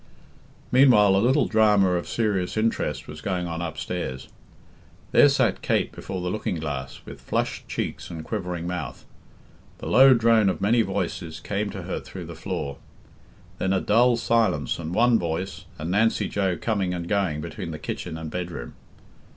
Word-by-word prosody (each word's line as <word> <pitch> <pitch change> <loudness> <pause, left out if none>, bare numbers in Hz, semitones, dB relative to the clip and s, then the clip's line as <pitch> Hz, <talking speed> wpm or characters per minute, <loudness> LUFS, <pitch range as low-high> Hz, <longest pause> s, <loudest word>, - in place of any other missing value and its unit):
Meanwhile 120 -7 +6
a 95 - +3
little 130 +6 +3
drama 105 -4 +4
of 90 -1 -1
serious 105 -4 -1
interest 110 -11 -1
was 75 0 -9
going 90 -2 -2
on 85 0 -4
upstairs. 80 -5 -4 0.8
There 145 - +7
sat 130 -7 +1
Kate - - 0
before 95 -1 -6
the 90 0 -2
looking 110 -4 -2
glass, 70 -5 -5
with - - -10
flushed - - -2
cheeks - - -4
and 80 -2 -6
quivering 90 -5 -4
mouth. 80 -7 -5 0.7
The - - -9
low 130 0 +7
drone 115 -3 +4
of 90 - -2
many 115 +4 +3
voices 90 -5 -3
came 100 +1 -2
to - - -7
her - - -3
through - - -9
the - - -8
floor. 70 -1 -4 0.8
Then 95 0 +1
a 95 - +2
dull 120 +4 +3
silence 110 - +1
and 80 -1 -5
one 115 +4 +4
voice, 85 +3 -4
and 80 +3 -4
Nancy 110 +4 +2
Joe 95 -4 0
coming 100 -5 -1
and 85 -1 -5
going 95 -7 0
between 75 - -6
the - - -5
kitchen 80 - -5
and 80 -1 -6
bedroom. 85 -9 -5
95 Hz, 165 wpm, -25 LUFS, 85-110 Hz, 0.8 s, There